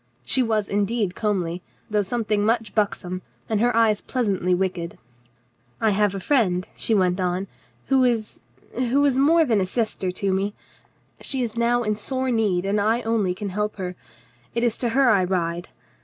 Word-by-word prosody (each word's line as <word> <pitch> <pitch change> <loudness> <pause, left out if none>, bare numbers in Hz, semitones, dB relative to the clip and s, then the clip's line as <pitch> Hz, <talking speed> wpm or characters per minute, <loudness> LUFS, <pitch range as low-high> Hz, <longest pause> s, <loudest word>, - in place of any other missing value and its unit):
She 265 - +2
was 220 -4 0
indeed 205 -1 0
comely, 185 -5 -1 0.3
though 210 -1 +1
something 210 0 -1
much 225 0 0
buxom, 185 -4 -1 0.3
and 215 -2 0
her 240 0 +2
eyes 220 -2 +3
pleasantly 195 -7 0
wicked. 175 -2 -2 0.8
"I 220 - +3
have 205 -1 +2
a - - -3
friend," 185 -6 +1
she 225 - 0
went 185 -1 +2
on, 180 +1 -1 0.4
"who 265 -1 +3
is 230 -4 0 0.2
— - - -29 0.2
who 280 +3 +3
is 265 -2 +2
more 320 +4 +5
than 225 -7 +2
a - - +1
sister 215 -3 -1
to 190 +1 -1
me. 200 +2 -1 0.6
She 265 -2 -2
is 230 -2 -4
now 240 +1 +2
in 215 -1 0
sore 260 +4 -2
need, 205 -6 +1
and 205 +1 +1
I 225 +4 +1
only 215 -5 0
can 205 +1 -4
help 210 +3 -2
her. 180 -2 -5 0.6
It 235 - 0
is 235 -2 +2
to 240 - 0
her 260 +1 +4
I 195 -3 +4
ride. 175 -2 -2
210 Hz, 185 wpm, -23 LUFS, 190-235 Hz, 0.8 s, more